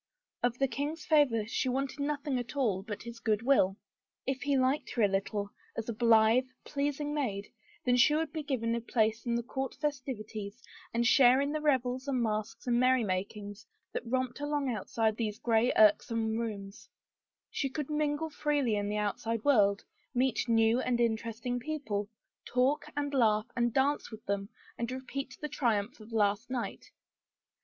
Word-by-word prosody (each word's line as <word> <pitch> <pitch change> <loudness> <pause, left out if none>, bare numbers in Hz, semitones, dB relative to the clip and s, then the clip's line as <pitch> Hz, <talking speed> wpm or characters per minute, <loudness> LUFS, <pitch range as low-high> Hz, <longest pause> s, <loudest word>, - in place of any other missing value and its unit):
Of 245 0 +1
the 270 - +2
king's 290 +6 -4
favor 275 -9 +3
she 245 +3 -1
wanted 270 +3 -2
nothing 285 -2 -1
at 245 +3 -6
all 220 -9 +1
but 205 0 -6
his 235 0 -8
good 220 -1 0
will. 205 -7 +3 0.5
If 265 0 -2
he 280 -1 +1
liked 260 +3 +1
her 235 - +2
a - - +6
little, 200 +1 -2 0.3
as 225 - -3
a - - -1
blithe, 230 +2 +4 0.2
pleasing 290 +1 -2
maid, 210 -9 -2 0.3
then 245 -1 +4
she 295 +5 +5
would 315 -1 -1
be 315 - -2
given 250 -6 -1
a 235 - -1
place 225 0 0
in 235 - +1
the 235 - -1
court 265 +2 -4
festivities 245 -6 -4 0.3
and 235 +1 +1
share 250 +1 +6
in 280 +1 0
the 305 0 -2
revels 260 -2 +1
and 265 -2 0
masques 215 -2 -2
and 240 -1 +2
merrymakings 205 -4 0 0.3
that - - -3
romped 255 +1 -1
along 290 -2 -1
outside 220 0 -1
these 215 -3 -2
gray, 230 +1 +2
irksome 220 +1 +4
rooms; 205 -4 -5 0.6
she 275 - -1
could 295 +2 -4
mingle 300 +1 0
freely 290 -6 +1
in 205 0 -1
the 210 - -1
outside 210 +2 -2
world, 205 -8 +4 0.3
meet 250 -1 +1
new 225 +1 +4
and 245 -1 0
interesting 230 +1 -1
people, 235 -8 -3 0.3
talk 255 +4 +1
and 285 0 -1
laugh 215 -5 +3
and 240 -1 +1
dance 275 +4 +1
with 220 -1 -11
them 200 0 -2 0.3
and 235 +1 -2
repeat 260 +1 -5
the 300 - -2
triumph 235 -6 -1
of 215 +1 -13
last 210 +1 +1
night. 255 -2 -4
240 Hz, 170 wpm, -31 LUFS, 220-275 Hz, 0.6 s, a